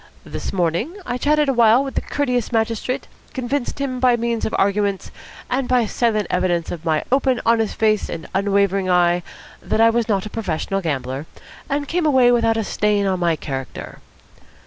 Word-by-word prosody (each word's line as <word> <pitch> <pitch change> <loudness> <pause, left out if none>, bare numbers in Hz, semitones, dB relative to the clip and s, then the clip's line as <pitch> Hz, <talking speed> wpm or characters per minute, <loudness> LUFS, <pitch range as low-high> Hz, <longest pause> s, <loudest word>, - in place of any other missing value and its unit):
This - - -5
morning 185 - -1
I 245 0 -3
chatted 300 +1 +2
a 270 - +2
while 235 +1 +5
with 270 - -5
the - - -1
courteous 250 -5 -1
magistrate, 230 +2 -1 0.3
convinced 260 +1 -2
him 270 -3 -3
by 250 -1 +4
means 235 -1 -1
of - - -2
arguments 200 0 0 0.4
and 255 0 -1
by 250 -2 +3
silent 215 -2 0
evidence 175 -2 0
of 170 -2 -6
my 160 -2 0
open, 265 -2 +2
honest 225 -2 +2
face 215 -2 +1
and 160 - -6
unwavering 195 -1 +1
eye 175 0 +3 0.4
that - - -1
I 230 0 +6
was 230 0 0
not 195 -2 +1
a - - -5
professional 195 -2 -2
gambler, 135 -3 -3 0.4
and 285 +1 -1
came 340 0 0
away 260 -4 +5
without 230 -2 +2
a 225 - 0
stain 205 0 0
on 190 -2 0
my 170 -2 +2
character." 135 -3 -6
220 Hz, 180 wpm, -20 LUFS, 185-250 Hz, 0.4 s, I